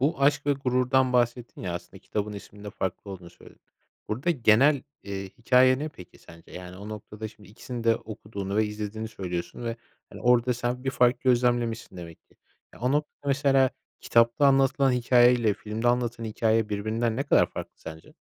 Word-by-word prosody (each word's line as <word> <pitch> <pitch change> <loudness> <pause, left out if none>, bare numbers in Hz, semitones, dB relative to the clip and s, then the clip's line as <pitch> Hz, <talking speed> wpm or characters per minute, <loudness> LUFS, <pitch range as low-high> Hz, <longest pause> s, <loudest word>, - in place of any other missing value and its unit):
Bu 140 +2 0
Aşk 145 +1 +3
ve 145 - +4
Gurur'dan 130 -1 +1
bahsettin 120 0 0
ya, 90 -2 -3
aslında 90 +2 -8
kitabın 105 +2 -4
isminin 105 0 -11
de 105 - -6
farklı 95 +1 -4
olduğunu 90 -2 -9
söyledin. - - -18 0.5
Burada 130 +11 -1
genel, 135 +1 +4 0.2
eee, 100 -1 -5
hikâye 130 +2 +4
ne 155 +2 -3
peki 90 - -14
sence, 85 0 -16
yani, 90 0 -9
o 100 +2 -9
noktada, 110 0 -7
şimdi, 105 -3 -18
ikisini 120 +2 -7
de 115 0 +4
okuduğunu 105 -2 -6
ve 110 0 +3
izlediğini 105 +1 -5
söylüyorsun 90 +1 -5
ve, 115 0 -3 0.3
hani, - - -11
orada 125 0 +3
sen 125 +2 -3
bir 135 - 0
fark 125 -1 +2
gözlemlemişsin 120 -4 +1
demek 85 -2 -10
ki. - - -28 0.4
Ya, - - -16
o 125 +3 +1
noktada, 150 -1 -2
mesela, 135 -1 +3 0.3
kitapta 115 +4 +3
anlatılan 135 0 +3
hikâye 125 0 +5
ile 110 -4 +1
filmde 110 +3 -2
anlatılan 120 -1 0
hikâye 110 0 +1
birbirinden 110 +3 -1
ne 135 - 0
kadar - - +3
farklı - - -7
sence? 80 0 -11
115 Hz, 180 wpm, -26 LUFS, 105-125 Hz, 0.5 s, hikâye